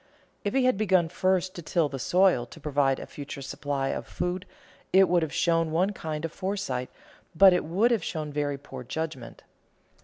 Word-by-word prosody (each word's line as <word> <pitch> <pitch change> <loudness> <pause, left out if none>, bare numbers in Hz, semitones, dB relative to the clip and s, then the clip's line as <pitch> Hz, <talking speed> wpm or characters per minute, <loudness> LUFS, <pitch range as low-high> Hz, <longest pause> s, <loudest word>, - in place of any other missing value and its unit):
If 205 +5 -2
he 265 -1 +3
had 255 -5 +2
begun 185 -5 +3
first 185 +1 0
to 175 - -7
till 160 0 +1
the 135 -2 -6
soil 180 -5 +3
to 160 - -13
provide 140 -3 +1
a - - -7
future 140 -1 -8
supply 135 0 -2
of - - -4
food 180 +1 -3 0.4
it 190 0 +6
would 175 0 +3
have 160 -3 -2
shown 165 0 +1
one 180 +5 +1
kind 155 -3 -4
of 165 - -4
foresight, 190 -10 -3 0.5
but 190 +2 +8
it 180 - +1
would 195 +10 +2
have 225 -7 +1
shown 155 -3 -4
very 145 -1 -1
poor 135 -2 -9
judgment. 135 -3 -6
165 Hz, 190 wpm, -27 LUFS, 145-185 Hz, 0.5 s, but